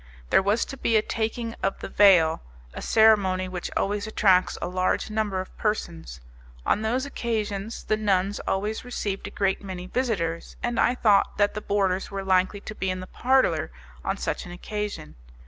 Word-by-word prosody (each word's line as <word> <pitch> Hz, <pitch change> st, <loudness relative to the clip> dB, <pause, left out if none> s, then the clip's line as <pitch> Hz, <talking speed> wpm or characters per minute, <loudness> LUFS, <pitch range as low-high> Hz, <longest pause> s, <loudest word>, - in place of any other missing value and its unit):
There -, -, +6 dB
was 205 Hz, +4 st, +1 dB
to 270 Hz, -, -8 dB
be 230 Hz, -3 st, +2 dB
a 215 Hz, -, +2 dB
taking 225 Hz, +1 st, -2 dB
of 195 Hz, -, 0 dB
the -, -, -6 dB
veil 175 Hz, -6 st, +5 dB, 0.3 s
a -, -, -7 dB
ceremony 200 Hz, -4 st, +4 dB
which 185 Hz, -1 st, -5 dB
always 205 Hz, +2 st, -1 dB
attracts 190 Hz, -4 st, +3 dB
a -, -, -3 dB
large 185 Hz, +3 st, 0 dB
number 215 Hz, -3 st, -1 dB
of 185 Hz, -, -11 dB
persons. 80 Hz, -, -3 dB, 0.4 s
On 210 Hz, -, +2 dB
those 245 Hz, +5 st, 0 dB
occasions 220 Hz, -5 st, -3 dB
the 215 Hz, -, 0 dB
nuns 200 Hz, -1 st, +1 dB
always 210 Hz, +3 st, -1 dB
received 205 Hz, -5 st, -4 dB
a -, -, -5 dB
great 195 Hz, -1 st, 0 dB
many 185 Hz, -2 st, -6 dB
visitors, 185 Hz, -8 st, -2 dB
and 240 Hz, -1 st, -1 dB
I 245 Hz, -, +3 dB
thought 210 Hz, -5 st, +3 dB
that 205 Hz, 0 st, +3 dB
the 210 Hz, -, -4 dB
boarders 195 Hz, -2 st, 0 dB
were 195 Hz, -1 st, -4 dB
likely 190 Hz, +1 st, +2 dB
to 215 Hz, -, -7 dB
be 190 Hz, -3 st, -2 dB
in 185 Hz, 0 st, -2 dB
the 185 Hz, -, -6 dB
parlour 260 Hz, +6 st, +2 dB, 0.3 s
on -, -, -1 dB
such -, -, -3 dB
an 175 Hz, -, -9 dB
occasion. 210 Hz, -, -5 dB
205 Hz, 180 wpm, -25 LUFS, 185-220 Hz, 0.4 s, There